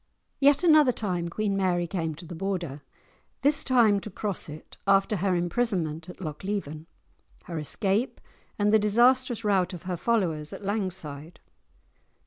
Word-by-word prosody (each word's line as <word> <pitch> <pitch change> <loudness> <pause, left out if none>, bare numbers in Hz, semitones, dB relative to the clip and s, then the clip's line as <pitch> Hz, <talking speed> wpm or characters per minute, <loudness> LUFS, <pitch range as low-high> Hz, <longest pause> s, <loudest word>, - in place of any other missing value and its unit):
Yet 285 +3 +4
another 305 -6 +6
time 180 -7 -2
Queen 205 +2 -1
Mary 180 -3 +1
came 165 -3 -3
to 170 - -11
the 170 - -8
Border, 170 -5 -3 0.6
this 290 +1 +4
time 230 -6 +4
to 215 - -8
cross 200 -3 -4
it—after 195 +7 0
her 185 +1 +1
imprisonment 175 -4 -1
at - - -10
Lochleven, 160 -2 -5 0.6
her 165 -2 -5
escape, 195 - 0 0.4
and 210 0 +2
the 220 - +6
disastrous 240 +2 +3
rout 190 -3 +1
of 175 - -11
her 180 -1 -3
followers 170 -7 0
at - - -8
Langside. 180 -6 -4
195 Hz, 140 wpm, -27 LUFS, 170-215 Hz, 0.6 s, another